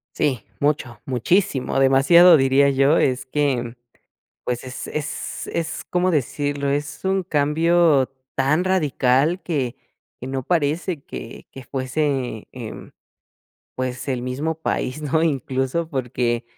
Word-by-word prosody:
Sí, 135 -6 0 0.2
mucho, 140 -6 -1
muchísimo, 135 - +1
demasiado 140 +7 +7
diría 135 0 +4
yo, 140 +3 +3
es 130 -1 +1
que 140 -2 0
mm 120 0 -8 0.7
pues 120 -1 -3
es 130 0 -7
es 150 0 -5
es, 165 -1 -3
¿cómo 180 +1 +1
decirlo? 145 -2 -1
Es 145 +1 -3
un 190 0 +1
cambio 160 -2 +3 0.3
tan 140 +6 +2
radical 155 -2 +2
que 135 -8 -2 0.5
que 125 - -5
no 135 0 -3
parece 165 +1 0
que 115 - -9
que 135 - -10
fuese, 130 -3 -2
em, 120 -4 -8 0.9
pues, 130 +1 -4
el 130 -2 -1
mismo 140 +6 -2
país, 130 -2 -2
¿no? 155 +2 0
Incluso 135 +1 -1
porque, 125 -4 -1
140 Hz, 125 wpm, -22 LUFS, 130-160 Hz, 0.9 s, demasiado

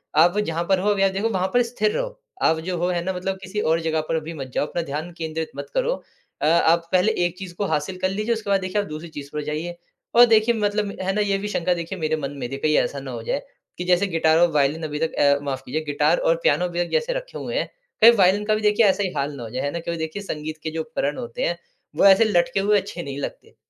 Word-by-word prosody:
आप 175 +5 +5
जहाँ 170 -4 -1
पर 190 -1 +4
हो 200 +3 +1
अभी 200 -2 +2
आप 195 - +3
देखो, 200 +4 -1
वहाँ 190 -3 0
पर 245 - +5
स्थिर 225 -3 0
रहो - - -4 0.2
आप 160 - +3
जो 175 +2 -3
हो 175 +1 0
है 175 -1 -1
ना, 190 +2 -2
मतलब 190 +1 -3
किसी 190 +3 -4
और 165 -2 +2
जगह 160 -1 0
पर 160 - +1
भी 165 +2 -6
मत 135 -4 -6
जाओ - - +1
अपना 175 - -2
ध्यान 155 +3 -5
केंद्रित 160 +1 -4
मत - - -6
करो। - - +1 0.5
अ, - - +1
आप 165 +1 +3
पहले 185 +4 +4
एक 175 0 -3
चीज़ 185 -2 -8
को 200 - -2
हासिल 155 +5 -2
कर 185 - +2
लीजिए, 215 +4 -1
उसके 220 -3 -5
बाद 195 -1 +3
देखिए 185 +3 0
आप 200 - -7
दूसरी 155 +2 -7
चीज़ 145 -3 -8
पर 150 0 -3
जाइए। 155 +4 -4 0.4
और 240 +1 +9
देखिए 225 0 +4
मतलब 205 -1 -1
है 190 +1 0
ना 210 - +1
ये 200 -1 +1
भी 200 +1 -4
शंका 180 -3 0
देखिए 175 +2 -5
मेरे 155 -1 0
मन 140 -2 -4
में 120 - -4
कहीं 150 +2 +1
ऐसा 140 - 0
ना 135 -1 -7
हो 115 -2 -6
जाए - - -1 0.4
कि 180 - -3
जैसे 180 +2 +3
गिटार 160 -3 +3
और 175 0 +4
वायलिन 150 +2 +1
अभी 150 -1 -3
तक 160 0 -1
अ, 140 0 +4
माफ 135 -2 -3
कीजिए 150 +5 -2
गिटार 145 - +2
और - - +2
पियानो 180 - +2
भी 175 0 -1
जैसे 480 +1 0
रखे - - -6
हुए - - -5
हैं। - - -1 0.3
कई 230 +2 +10
वायलिन 200 -2 +3
का 215 0 +2
भी 215 - -2
देखिए 210 +1 +4
ऐसा 200 0 +3
ही 185 - -1
हाल 140 +1 -1
ना 125 - -7
हो 115 - -7
जाए 125 +3 -3
है 145 - -1
ना, 170 - -3
कभी 170 0 -4
देखिए 160 +5 -4
संगीत 155 -4 -5
के 160 - -3
जो 160 0 -2
उपकरण 155 -2 -2
होते 115 0 -5
हैं 170 - -1 0.4
वो 160 - +3
ऐसे 195 +3 +7
लटके 175 -3 +2
हुए 205 +2 +3
अच्छे 190 -3 -7
नहीं 140 -1 -6
लगते। - - -7
175 Hz, 275 wpm, -23 LUFS, 155-205 Hz, 0.5 s, कई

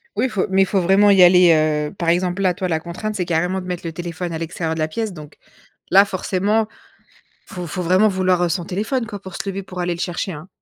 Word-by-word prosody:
Oui 245 +5 +1
faut 210 -5 -1
mais 190 0 +3
faut 190 0 0
vraiment 195 +3 +4
y 195 -2 +5
aller, 180 -1 +7
heu, 155 -1 0
par 170 -3 -2
exemple, 180 +2 0
là, 185 -2 +2
toi 185 +1 -3
la 160 -3 0
contrainte 180 +6 -5
c'est 180 -3 -2
carrément 175 +3 -1
de - - -10
mettre 180 -1 -5
le 165 - -4
téléphone 170 +1 -5
à - - -3
l'extérieur 165 0 -3
de 160 - -5
la 155 - +1
pièce. 215 +6 -4
Donc, 150 -3 -11 0.6
là 195 +2 +7
forcément, 200 +3 0 0.8
faut 180 -2 -7
faut 175 +4 -4
vraiment 185 +5 +3
vouloir, 185 -2 +1
heu, 175 - +1
son 170 +1 -2
téléphone 220 +8 -2
quoi, 205 -2 -7
pour 190 -2 -10
se 200 - -4
lever 195 0 -5
pour 185 -1 -9
aller 175 0 -1
le - - -11
chercher, 175 +1 -3
hein. 155 +3 -10
180 Hz, 250 wpm, -20 LUFS, 170-195 Hz, 0.8 s, aller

